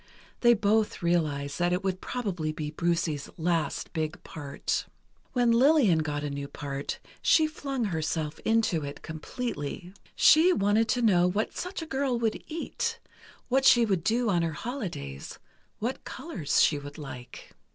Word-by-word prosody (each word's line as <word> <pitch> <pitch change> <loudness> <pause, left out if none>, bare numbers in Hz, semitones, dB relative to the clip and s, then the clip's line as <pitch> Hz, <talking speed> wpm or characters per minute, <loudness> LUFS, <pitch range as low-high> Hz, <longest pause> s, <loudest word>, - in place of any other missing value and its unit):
They 240 -1 +6
both 215 -1 +1
realized 150 -5 0
that 175 0 +2
it 180 +2 -1
would 190 -1 -1
probably 185 -11 -2
be 155 -1 -5
Brucie's 165 -2 -1
last 165 -1 -1
big 160 -1 -3
part. 145 -3 -3 0.5
When 245 -2 +3
Lillian 240 - +5
got 150 -2 -2
a 145 - -2
new 140 0 -4
part, 140 -1 -5 0.2
she 315 - +5
flung 275 -5 -3
herself 160 -4 -2
into 220 -8 +1
it 140 0 -7
completely. 160 - -5 0.2
She 335 +4 +6
wanted 205 - +2
to 245 -1 +1
know 180 -5 +5
what 205 +5 -1
such 360 -1 -4
a - - -6
girl 270 -4 0
would 230 -2 -1
eat; 460 +8 -3 0.5
what 265 +2 +2
she 240 -3 +7
would 190 -6 0
do 230 +4 +1
on 175 -2 +2
her 165 -1 -1
holidays; 155 - -5 0.4
what 240 +5 -3
colors 175 - 0
she 150 - +3
would 145 0 -9
like. 130 -5 -9
180 Hz, 155 wpm, -28 LUFS, 155-240 Hz, 0.5 s, she